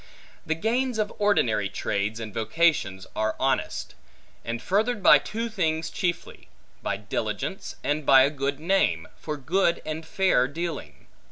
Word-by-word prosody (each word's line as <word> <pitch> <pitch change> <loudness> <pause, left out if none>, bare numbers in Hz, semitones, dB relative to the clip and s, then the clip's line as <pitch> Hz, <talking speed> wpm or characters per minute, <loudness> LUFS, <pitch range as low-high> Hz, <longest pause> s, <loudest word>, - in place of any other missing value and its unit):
The 160 - +1
gains 240 +7 0
of 210 -1 -1
ordinary 115 - +2
trades 100 +2 -2
and 110 -3 -6
vocations 110 - +1
are 110 0 0
honest; 135 0 -1 0.5
and 115 0 -3
furthered 210 - 0
by 150 - +8
two 225 +10 -4
things 160 -7 -1
chiefly: 175 -2 -3 0.3
by - - -2
diligence, - - -4
and 150 +1 0
by 135 -1 +7
a 140 - +2
good 140 -1 -2
name, 190 +5 +1
for 150 -1 -5
good 170 +5 +1
and 155 +1 -4
fair 160 -6 +2
dealing. 145 - -6
155 Hz, 145 wpm, -26 LUFS, 125-190 Hz, 0.5 s, by